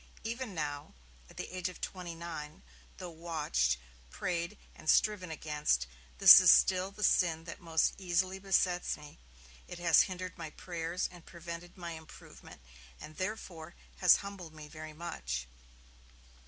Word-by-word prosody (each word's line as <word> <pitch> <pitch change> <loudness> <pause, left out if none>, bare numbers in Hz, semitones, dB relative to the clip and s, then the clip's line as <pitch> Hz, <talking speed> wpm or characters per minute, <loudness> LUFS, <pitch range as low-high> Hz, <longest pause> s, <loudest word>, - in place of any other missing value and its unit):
Even 230 -2 -4
now 145 - -4 0.3
[at - - -17
the - - -6
age 185 0 -2
of 180 - -12
twenty 180 -3 -5
nine], 160 - -7 0.3
tho' 175 - -7
watched, 150 - 0 0.3
prayed 175 - -3 0.2
and 155 - -6
striven 205 -4 +3
against, 150 - 0 0.3
this - - +11
is - - +6
still 185 0 +5
the 205 +1 -8
sin 165 -4 +3
that 165 - -8
most 165 -2 +1
easily 185 +1 0
besets 185 -2 +1
me. 150 - -13 0.5
It - - -8
has 170 -2 +5
hindered 185 -1 -6
my 160 - -5
prayers 170 +2 -3
and 175 -2 -14
prevented 170 +1 -9
my 170 -2 -6
improvement, 160 -1 -12 0.4
and 155 +1 -11
therefore, 185 -4 -5 0.2
has 180 - +7
humbled 180 -6 -8
me 155 -1 -10
very 155 0 -9
much.' 65 - -4
170 Hz, 145 wpm, -32 LUFS, 155-185 Hz, 0.5 s, this